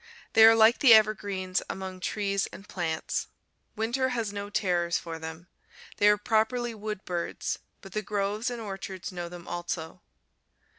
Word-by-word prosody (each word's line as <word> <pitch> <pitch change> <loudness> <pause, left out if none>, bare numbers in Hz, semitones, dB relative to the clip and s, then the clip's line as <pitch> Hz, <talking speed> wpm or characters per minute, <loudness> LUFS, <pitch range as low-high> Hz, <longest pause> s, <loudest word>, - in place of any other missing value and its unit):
They 220 - +7
are 225 0 +8
like 225 +2 +6
the 245 -5 +9
evergreens 200 -4 +1
among 190 -1 -5
trees 200 +1 -1
and 200 - -12
plants. 165 -3 -2 0.5
Winter 240 +4 0
has 230 -5 -2
no 205 0 -5
terrors 175 -4 +1
for 165 -1 -6
them. 160 +2 -8 0.5
They 205 - +4
are 210 - +5
properly 230 +3 +1
wood 210 -2 -6
birds, 175 -1 -3 0.2
but 195 - -12
the 215 - -2
groves 210 +3 -1
and 240 -1 -5
orchards 195 -3 -6
know 175 -1 -5
them 175 0 -10
also. 175 -2 -5
200 Hz, 155 wpm, -28 LUFS, 180-220 Hz, 0.5 s, the